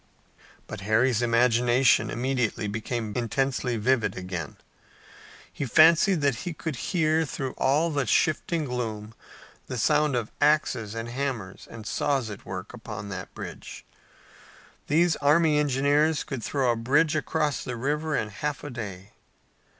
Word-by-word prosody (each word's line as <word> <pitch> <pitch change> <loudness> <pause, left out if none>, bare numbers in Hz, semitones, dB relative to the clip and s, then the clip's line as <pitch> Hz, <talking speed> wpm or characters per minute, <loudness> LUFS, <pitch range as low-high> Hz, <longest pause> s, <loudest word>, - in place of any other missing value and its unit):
But - - -8
Harry's 115 +3 +2
imagination 120 -1 +3
immediately 125 -3 -1
became 110 +1 -3
intensely 125 0 -1
vivid 115 0 +1
again. 90 -5 -5 1.0
He - - -4
fancied 165 - +5
that 140 -4 +1
he 175 +7 -5
could 160 -1 -5
hear 160 +3 +1
through 135 -3 -4
all 150 +5 +1
the 140 -4 -1
shifting 155 +3 +1
gloom 115 -4 -4 0.5
the 125 - -4
sound 150 +3 +2
of 115 -3 -2
axes 145 -8 +2
and 115 0 -4
hammers 120 -6 -4
and 110 -2 -10
saws 130 0 -1
at 100 - -10
work 95 +3 -6
upon 105 -4 -7
that 95 -2 -7
bridge. - - -8 1.0
These 165 +2 +3
army 150 +1 +3
engineers 145 +2 +2
could 130 -5 -6
throw 135 -4 +1
a - - 0
bridge 145 +7 +2
across 150 -2 -1
a 125 - -3
river 150 +5 -1
in 110 - -2
half 145 +8 -4
a 145 - -6
day. 100 -5 -7
130 Hz, 140 wpm, -26 LUFS, 115-150 Hz, 1.0 s, fancied